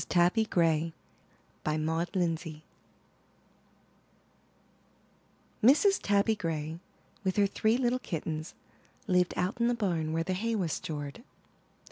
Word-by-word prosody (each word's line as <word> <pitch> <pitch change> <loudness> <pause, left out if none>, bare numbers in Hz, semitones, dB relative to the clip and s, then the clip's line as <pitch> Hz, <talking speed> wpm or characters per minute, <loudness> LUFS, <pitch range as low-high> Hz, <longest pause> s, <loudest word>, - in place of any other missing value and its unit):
TABBY 180 +5 +3
GRAY^ 165 -3 +2 0.8
Maud 160 +2 -1
Lindsay 165 -3 -1 3.0
Mrs. 315 - +5
Tabby 205 +2 +2
Gray, 160 -3 -3 0.4
with 190 -1 0
her 205 - +4
three 220 +3 +1
little 250 0 +1
kittens, 160 -5 -4 0.5
lived 180 -4 +2
out 185 +6 -1
in 235 - +4
the 240 - +2
barn 170 -8 -1
where 165 +1 0
the 185 +2 -2
hay 225 +5 -1
was 180 -7 -1
stored. 145 +2 -5
180 Hz, 110 wpm, -30 LUFS, 160-215 Hz, 3.0 s, Mrs